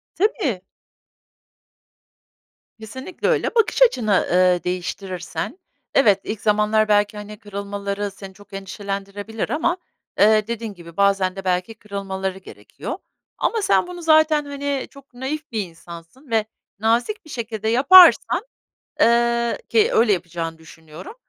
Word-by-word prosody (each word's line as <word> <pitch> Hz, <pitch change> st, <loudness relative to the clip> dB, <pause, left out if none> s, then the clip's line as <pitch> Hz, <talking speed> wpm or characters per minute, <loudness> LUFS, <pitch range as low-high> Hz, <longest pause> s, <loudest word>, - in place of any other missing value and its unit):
Tabii. 345 Hz, -, 0 dB, 2.2 s
Kesinlikle 260 Hz, -, -5 dB
öyle. -, -, +1 dB
Bakış 455 Hz, +2 st, +2 dB
açını, 220 Hz, -, +2 dB
ııı, 180 Hz, 0 st, +3 dB
değiştirirsen, 180 Hz, -, -4 dB, 0.4 s
evet, 205 Hz, -7 st, +4 dB
ilk 215 Hz, -1 st, -5 dB
zamanlar 215 Hz, +1 st, +2 dB
belki, 205 Hz, 0 st, +2 dB
hani, 210 Hz, 0 st, -8 dB
kırılmaları 200 Hz, 0 st, -4 dB
seni 195 Hz, -1 st, -11 dB
çok 205 Hz, 0 st, -19 dB
endişelendirebilir 200 Hz, +2 st, -5 dB
ama, 330 Hz, +5 st, 0 dB, 0.4 s
eee, 215 Hz, +1 st, +5 dB
dediğin 230 Hz, -2 st, -4 dB
gibi 170 Hz, -1 st, -14 dB
bazen 195 Hz, -2 st, +2 dB
de 195 Hz, -1 st, -8 dB
belki 185 Hz, +5 st, -1 dB
kırılmaları 190 Hz, -2 st, -5 dB
gerekiyor, 190 Hz, -, -8 dB, 0.4 s
ama 450 Hz, -2 st, 0 dB
sen 395 Hz, -2 st, +2 dB
bunu 355 Hz, -1 st, -8 dB
zaten, 315 Hz, -2 st, +4 dB
hani, 280 Hz, -1 st, -3 dB
çok 275 Hz, -1 st, -17 dB
naif 275 Hz, +5 st, -5 dB
bir 220 Hz, -2 st, -1 dB
insansın 170 Hz, -, -13 dB
ve 220 Hz, -1 st, +2 dB, 0.3 s
nazik 235 Hz, -, 0 dB
bir 315 Hz, -, -15 dB
şekilde 220 Hz, -4 st, -4 dB
yaparsan, 345 Hz, -, +6 dB, 0.6 s
ııı, 235 Hz, 0 st, +2 dB
ki 450 Hz, +1 st, +3 dB
öyle 225 Hz, -2 st, +4 dB
yapacağını 165 Hz, -2 st, -3 dB
düşünüyorum. 160 Hz, -, -12 dB
210 Hz, 125 wpm, -21 LUFS, 195-265 Hz, 2.2 s, yaparsan